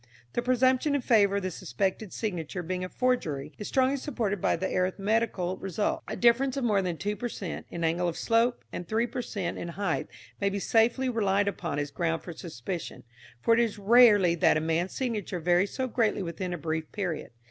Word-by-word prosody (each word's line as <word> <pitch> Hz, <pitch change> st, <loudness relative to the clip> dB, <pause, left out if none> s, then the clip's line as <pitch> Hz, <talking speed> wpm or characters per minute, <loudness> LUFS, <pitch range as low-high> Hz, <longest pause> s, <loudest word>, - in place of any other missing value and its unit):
The -, -, 0 dB
presumption 255 Hz, +3 st, +2 dB
in 285 Hz, -, +1 dB
favour 205 Hz, -5 st, +4 dB
of 200 Hz, -, -1 dB
the 185 Hz, -, -2 dB
suspected 195 Hz, +3 st, -2 dB
signature 180 Hz, -4 st, -3 dB
being 180 Hz, +2 st, -3 dB
a 185 Hz, -, -4 dB
forgery 155 Hz, -, -1 dB
is 210 Hz, -, -5 dB
strongly 265 Hz, +1 st, +2 dB
supported 220 Hz, -, -2 dB
by -, -, +2 dB
the 190 Hz, -, -3 dB
arithmetical 190 Hz, 0 st, 0 dB
result. 195 Hz, +2 st, -1 dB
A -, -, -4 dB
difference 255 Hz, +3 st, +3 dB
of 275 Hz, -, -1 dB
more 210 Hz, -4 st, +3 dB
than 180 Hz, -3 st, -2 dB
2 205 Hz, +4 st, -2 dB
per 240 Hz, +2 st, -4 dB
cent. 185 Hz, -6 st, -6 dB
in 170 Hz, -, -5 dB
angle 170 Hz, +2 st, +1 dB
of 170 Hz, -, -3 dB
slope, 230 Hz, +1 st, +1 dB
and 175 Hz, -, -5 dB
3 225 Hz, +2 st, +1 dB
per 245 Hz, +2 st, -4 dB
cent. 195 Hz, -7 st, -4 dB
in -, -, -4 dB
height 175 Hz, 0 st, -2 dB, 0.3 s
may 200 Hz, -, +2 dB
be 200 Hz, -, -3 dB
safely 235 Hz, +5 st, +2 dB
relied 205 Hz, -4 st, +1 dB
upon 170 Hz, -7 st, -2 dB
as 145 Hz, 0 st, -2 dB
ground 165 Hz, 0 st, -1 dB
for 175 Hz, -, -7 dB
suspicion, 165 Hz, +1 st, -6 dB, 0.4 s
for 230 Hz, -, +5 dB
it 230 Hz, -, +4 dB
is 230 Hz, -3 st, +1 dB
rarely 205 Hz, -4 st, +6 dB
that 165 Hz, -2 st, +3 dB
a -, -, +2 dB
man's 165 Hz, +3 st, -1 dB
signature 215 Hz, -8 st, -2 dB
varies 175 Hz, +4 st, +2 dB
so 260 Hz, -, 0 dB
greatly 220 Hz, -4 st, +1 dB
within 180 Hz, +1 st, -4 dB
a 175 Hz, -, -2 dB
brief 160 Hz, 0 st, -3 dB
period. 180 Hz, -7 st, -3 dB
200 Hz, 205 wpm, -28 LUFS, 175-230 Hz, 0.4 s, rarely